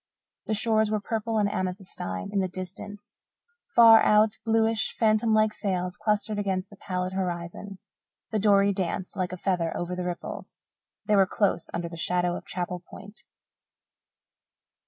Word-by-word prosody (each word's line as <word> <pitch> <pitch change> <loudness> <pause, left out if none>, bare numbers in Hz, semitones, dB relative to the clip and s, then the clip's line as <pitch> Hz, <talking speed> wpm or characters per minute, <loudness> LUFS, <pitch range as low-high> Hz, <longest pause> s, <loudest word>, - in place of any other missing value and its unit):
The 215 - 0
shores 220 0 +2
were 215 0 0
purple 225 +1 -2
and 210 -1 +3
amethystine 185 - -4
in 200 - +2
the 190 - +1
distance. 195 +3 -8 0.6
Far 225 -1 +9
out, 210 +1 +5
bluish, 225 0 +1
phantom 220 0 +3
like 215 0 +3
sails 180 -2 -2
clustered 210 0 -1
against 190 -1 -2
the - - -12
pallid 185 -1 -3
horizon. 180 +1 -4 0.5
The 215 - 0
dory 200 -1 +4
danced 185 -1 -2
like 185 -2 -2
a 185 - -5
feather 175 -3 -1
over 175 +1 -3
the 180 0 -4
ripples. 175 -1 -7 0.4
They 210 - +3
were 195 -1 +5
close 195 -3 0
under 170 0 -3
the 170 0 -9
shadow 175 +1 0
of - - -8
Chapel 180 0 -3
Point. 205 +2 -12
195 Hz, 155 wpm, -27 LUFS, 180-215 Hz, 0.6 s, Far